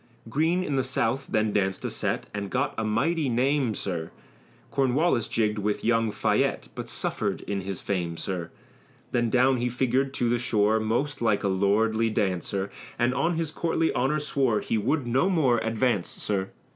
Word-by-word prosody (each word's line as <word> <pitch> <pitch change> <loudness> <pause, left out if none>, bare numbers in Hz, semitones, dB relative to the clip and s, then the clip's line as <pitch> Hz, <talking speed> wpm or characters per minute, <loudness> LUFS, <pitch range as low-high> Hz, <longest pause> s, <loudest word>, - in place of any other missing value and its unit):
Greene 165 +8 +1
in 145 -6 -1
the 130 - +2
South 130 +1 0
then 110 -1 +1
danced 95 -2 0
a - - 0
set, - - -1
And 100 -1 -4
got 135 +6 0
a 110 - -2
mighty 135 +8 +1
name, 130 -1 +1
sir, 85 -5 -3 0.6
Cornwallis 135 -2 +2
jigged 105 -2 0
with 105 0 -1
young 115 -1 +3
Fayette, - - 0
But - - -6
suffered - - -2
in 100 -1 -3
his 95 -1 -5
fame, 85 -4 -2
sir. 90 -3 -4 0.6
Then 120 -1 +1
down 130 +2 +4
he 125 +1 0
figured 130 +2 +1
to 120 - +1
the 120 +1 +1
shore, 110 -2 +2
Most 120 +7 -1
like 110 -3 +2
a - - +2
lordly 110 +4 +2
dancer, 100 -1 -1 0.3
And 120 +1 +2
on 165 +6 +1
his 160 -2 -2
courtly 165 -1 0
honor 135 +5 +1
swore 135 -7 +1
He - - -2
would 130 +6 0
no 130 +10 +2
more 135 -10 +3
advance, 115 -3 0
sir. 95 -2 -2
115 Hz, 175 wpm, -26 LUFS, 105-135 Hz, 0.6 s, down